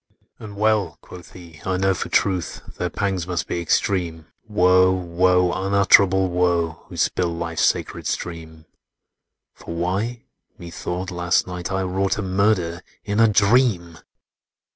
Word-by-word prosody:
"And 105 -2 -10
well," 105 -4 +1
quoth 90 -2 -13
he, 85 -4 -13
"I 95 -1 -1
know 95 +1 +2
for 85 - -5
truth, 95 -3 -1
Their - - -1
pangs 95 -4 -2
must 90 -3 -2
be 85 - -3
extreme,— 85 -2 -1 0.2
Woe, 95 -3 +4
woe, 90 0 +2
unutterable 95 -1 +4
woe,— 85 -2 0
Who - - -10
spill 90 -1 0
life's 85 0 -3
sacred - - 0
stream! 80 -2 -6 0.9
For 85 - -9
why, 100 +8 -2 0.3
Methought 90 +2 -5
last 90 0 +1
night 90 -1 -6
I 95 0 -1
wrought 95 +2 -1
A 105 - -3
murder, 95 -3 0 0.2
in 105 +1 -2
a 115 - +6
dream! 100 -5 +2
90 Hz, 140 wpm, -22 LUFS, 85-100 Hz, 0.9 s, a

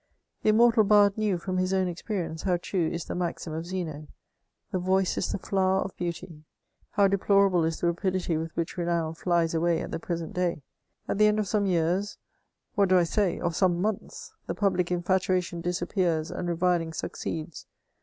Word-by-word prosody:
The - - +2
immortal 230 +1 +5
bard 205 -1 +5
knew, 210 -4 0
firam 185 +1 -3
his 185 +1 0
own 190 -1 +2
experience, 175 -2 -4
how 180 -3 +1
true 175 -1 -1
is 170 -2 -4
the - - -5
maxim 175 -2 -3
of 165 +2 -4
Zeno: 180 -4 -3
*^ 150 +1 -10 0.6
The 185 - 0
voice 185 +1 +1
is - - -1
the - - -1
flower 190 0 +1
of 195 - -7
beauty. 170 -2 -5 0.5
How 200 -2 +4
deplorable 195 -2 +3
is 160 0 -1
the - - -1
rapidity 180 0 0
with 160 +1 -2
which 170 +2 -3
renown 170 -2 -1
flies 170 -1 +1
away 165 0 +2
at - - -5
the 165 - -3
present 165 -1 -4
day! 175 -5 -1 0.4
At - - -2
the 215 - +6
end 210 0 +2
of 210 -2 0
some 205 -1 +1
years, 180 +3 0 0.6
what 200 -2 +2
do 185 - +6
I 175 - +5
say? 180 +2 0
of 170 -2 -2
some 175 -2 +2
months, 215 - -3
the - - -3
public 185 -3 +1
in&tuation 180 -1 0
disappears, 175 -2 -1
and 175 - -4
reviling 170 -1 +1
succeeds. 160 0 -5
180 Hz, 190 wpm, -27 LUFS, 170-195 Hz, 0.6 s, the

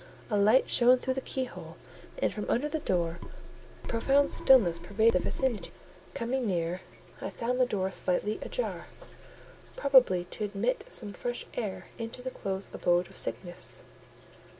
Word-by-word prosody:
A - - +2
light 215 +6 +5
shone 250 +1 +5
through 260 +1 -1
the 265 - -3
keyhole 260 -1 -5 0.4
and - - 0
from 210 - -5
under 270 +6 +1
the 315 +1 -2
door; 170 - -1 0.6
a - - -10
profound 275 +5 +2
stillness 200 -11 +5
pervaded 210 +6 +2
the 180 - +3
vicinity. 260 -5 -1 0.5
Coming 250 -1 -1
near, 175 -1 -1 0.4
I - - -3
found 250 +2 -1
the 250 - +4
door 190 -4 -1
slightly 205 +4 0
ajar; - - -3 0.9
probably 255 - +4
to 215 - -4
admit 210 +5 -1
some 205 -4 -2
fresh 240 +5 -4
air 210 -5 -4
into 230 +2 -6
the 260 - -4
close 195 -3 -4
abode 175 0 +1
of 190 - -15
sickness. 175 -2 -3
220 Hz, 150 wpm, -29 LUFS, 190-255 Hz, 0.9 s, light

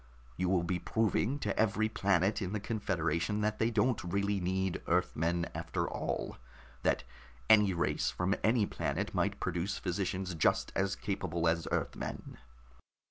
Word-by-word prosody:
You 90 +5 0
will 90 -2 +2
be 90 +1 -1
proving 115 - +1
to - - -1
every 110 0 +3
planet 100 0 +1
in 95 +1 -3
the 105 - 0
confederation 95 -2 -1
that 105 0 0
they 110 - +3
don't 120 +2 +1
really 100 +3 0
need 95 0 -1
Earthmen 85 -1 +1
after - - -2
all, - - -3 0.4
that - - +1 0.5
any 105 -3 +7
race 85 - +1
from 90 +2 0
any 110 -1 +4
planet - - -2
might - - 0
produce 90 +3 -1
physicians 95 0 -2
just 80 - +2
as 95 +1 +1
capable 85 -4 -2
as 80 0 +1
Earthmen." - - -3
95 Hz, 145 wpm, -32 LUFS, 85-105 Hz, 0.5 s, any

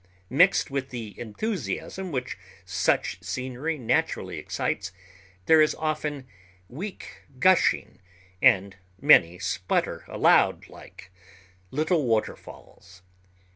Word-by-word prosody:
Mixed 180 +3 +4
with 135 -1 -3
the 115 -4 -7
enthusiasm 180 - -4
which 130 -2 -3 0.3
such 90 -1 0
scenery 130 +9 -4
naturally 120 -5 -1
excites, - - -3 0.5
there 160 -1 +6
is 155 - +3
often 150 -3 -3 0.4
weak 185 - -8 0.2
gushing, 185 +5 +2 0.4
and 95 0 +3 0.2
many 90 - +5
splutter 95 -1 -2
aloud - - +3
like 95 - -14 0.6
little 155 - 0
waterfalls. 95 -4 -4
130 Hz, 95 wpm, -26 LUFS, 100-155 Hz, 0.6 s, there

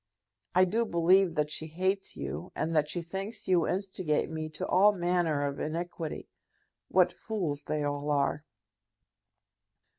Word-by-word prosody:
I 185 +1 +6
do 225 +6 +1
believe 180 -2 +3
that 150 -1 0
she 160 - 0
hates 185 +4 -1
you, 180 - -5
and 165 +1 -1
that 150 -1 +2
she 175 +2 -2
thinks 195 +6 -5
you 180 -3 +3
instigate 185 -5 -1
me 155 -1 -4
to - - -2
all 205 +3 +5
manner 175 -5 +1
of 140 0 -3
iniquity. 165 0 -4 0.6
What 180 -1 +4
fools 165 -10 -3
they 150 -1 -1
all 145 0 -2
are!" 145 0 +1
170 Hz, 145 wpm, -30 LUFS, 150-185 Hz, 0.6 s, I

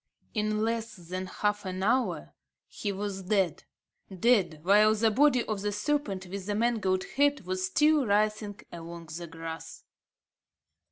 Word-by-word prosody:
In 215 -1 0
less 230 0 -2
than 185 +1 -6
half 210 +2 -1
an 185 -1 -4
hour, 250 +5 0 0.3
he 205 - -4
was 200 0 -4
dead, 190 -3 0 0.5
dead, 190 -5 +2
while 210 +3 +5
the 220 +1 +3
body 255 +1 +4
of 215 -3 -3
the 205 0 -1
serpent 210 -4 -1
with 190 +1 -6
the 205 - 0
mangled 210 -5 +1
head 285 0 +3
was 185 0 -1
still 300 +5 +3
writhing 210 0 +1
along 170 -1 -9
the 170 0 -6
grass. 165 0 -8
205 Hz, 145 wpm, -29 LUFS, 185-225 Hz, 0.5 s, while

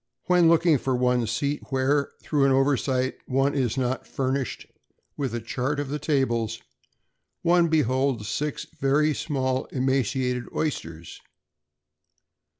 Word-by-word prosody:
When 180 -2 +5
looking 165 -3 +4
for 130 +1 -1
one's 125 -2 +1
seat, 140 +5 -1
where, 140 +1 +1
through 145 -3 +2
an 135 - +4
oversight, 130 -1 +1
one 135 +2 +1
is 130 -3 0
not 130 0 -1
furnished 130 -1 -2 0.5
with 135 -5 -3
a - - -1
chart 130 +5 -2
of 145 -2 -3
the 150 +2 -3
tables, 120 -7 0 0.8
one 175 0 +4
beholds 130 -6 +1
six 150 +5 -3
very 150 +3 +1
small 130 -4 -1
emaciated 130 -1 0
oysters. 85 - -4
135 Hz, 125 wpm, -25 LUFS, 125-145 Hz, 0.8 s, When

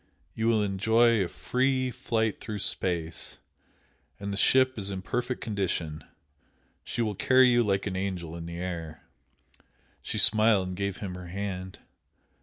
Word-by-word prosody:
You 110 0 -1
will 110 -2 +3
enjoy 110 +3 +3
a - - -2
free 130 +6 0
flight 110 -2 -1
through 110 -2 -5
space, 85 -4 -2 0.8
and 100 0 -4
the - - -2
ship 130 +4 +3
is 100 0 -3
in 95 -1 -5
perfect 125 +4 -2
condition; 90 -7 -2 0.8
she 120 - -2
will 105 -2 -1
carry 130 +5 +5
you 120 0 +4
like 100 -3 0
an 100 -2 -3
angel 90 -4 -3
in 85 0 -7
the 85 0 -6
air!" 85 -4 -5 1.0
She - - -4
smiled 105 -3 +5
and 90 - -5
gave 100 0 -2
him 95 -3 -5
her 90 -1 -8
hand. 95 0 -5
100 Hz, 155 wpm, -28 LUFS, 90-115 Hz, 1.0 s, carry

